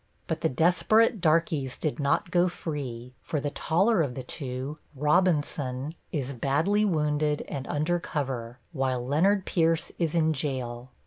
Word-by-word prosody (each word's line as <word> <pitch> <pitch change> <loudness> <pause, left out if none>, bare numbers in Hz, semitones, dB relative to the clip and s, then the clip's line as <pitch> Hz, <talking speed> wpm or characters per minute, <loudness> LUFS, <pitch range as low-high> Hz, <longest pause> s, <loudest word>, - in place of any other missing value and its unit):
But - - -3
the - - +2
desperate 180 - +3
darkies 155 -5 +1
did 155 -2 -2
not 145 +6 +1
go 180 0 +3
free, 130 -8 -5
for 150 - -2
the 145 +1 -2
taller 190 +7 +2
of 135 -6 -1
the 130 - -5
two, 130 +2 -5 0.2
Robinson, 150 -3 +1 0.2
is 140 -2 -2
badly 155 - +1
wounded 150 -5 +1
and 135 -2 -5
under 155 +4 0
cover, 130 -7 -4
while 130 -5 -1
Leonard 185 +9 +2
Pierce 165 -1 +1
is 165 -2 0
in 160 -1 +3
jail. 130 -4 -3
150 Hz, 145 wpm, -27 LUFS, 130-170 Hz, 0.2 s, desperate